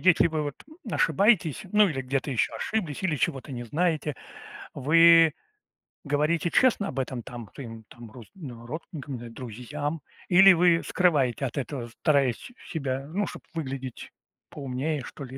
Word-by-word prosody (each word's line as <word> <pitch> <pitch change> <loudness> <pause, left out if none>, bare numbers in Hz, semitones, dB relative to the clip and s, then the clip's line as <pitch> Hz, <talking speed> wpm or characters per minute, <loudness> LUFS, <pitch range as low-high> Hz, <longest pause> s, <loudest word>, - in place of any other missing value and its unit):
если 185 -2 +5
вы 155 -2 -2
вот 145 -1 -4 0.4
ошибаетесь, 195 0 +2
ну, 210 -1 +5
или 135 -6 -3
где-то 135 +2 -2
ещё 120 -5 0
ошиблись, 195 -9 -3
или 170 -5 0
чего-то 140 0 -2
не 120 -1 -5
знаете, 155 +1 0 0.6
вы 165 +2 +6 0.7
говорите 150 +3 +1
честно 225 -1 +3
об 135 - -4
этом, 130 -2 -3
там, 120 -3 -9
своим, 115 -4 -9
там, 120 -2 -12
рус 120 -2 -12
ну, 125 -10 -9
родственникам 145 0 -7
н 120 - -8
э, - - -10
друзьям? 130 +7 -5 0.3
Или 190 +1 +8
вы 170 -1 +4
скрываете 140 -8 +2
от 125 - -5
этого, 130 -3 -4
стараясь 140 -6 +3 0.3
с - - -11
себя, 135 -5 -3
ну, 200 +6 -2
чтоб - - -8
выглядеть 135 -5 -6 0.4
поумнее, 140 +2 -3
что 140 - -9
ли, 130 0 -8
145 Hz, 160 wpm, -26 LUFS, 130-165 Hz, 0.7 s, Или